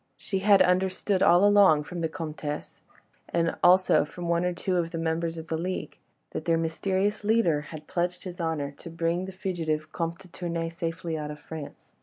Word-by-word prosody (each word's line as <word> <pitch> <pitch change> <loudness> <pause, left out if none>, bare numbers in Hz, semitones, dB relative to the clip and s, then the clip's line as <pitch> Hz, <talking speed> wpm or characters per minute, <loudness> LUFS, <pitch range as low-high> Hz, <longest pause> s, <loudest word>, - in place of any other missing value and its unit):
She 195 - -3
had 195 -1 +6
understood 185 +1 +1
all 175 +3 +6
along 200 -7 +6
from 175 +3 -6
the 160 - 0
Comtesse, 155 -3 -5 0.5
and 165 -1 +1
also 185 +1 +6
from 170 +4 -7
one 170 0 +2
or 180 - +1
two 180 +1 -1
of 170 -1 0
the 165 - -5
members 165 0 -1
of 160 - -6
the 160 -1 -2
league, 185 +2 -4 0.3
that - - -5
their 165 -1 +3
mysterious 190 +6 0
leader 205 -9 +3
had 155 +1 -9
pledged 175 0 -2
his 180 -2 -6
honour 155 -4 -1
to 170 - -9
bring 165 +2 -1
the 190 - -6
fugitive 160 -5 -3
Comte 170 0 -2
de 190 0 -15
Tournay 170 -1 -3
safely 165 -1 -4
out 150 0 -4
of 150 0 -7
France. 155 -1 -9
170 Hz, 195 wpm, -27 LUFS, 160-185 Hz, 0.5 s, had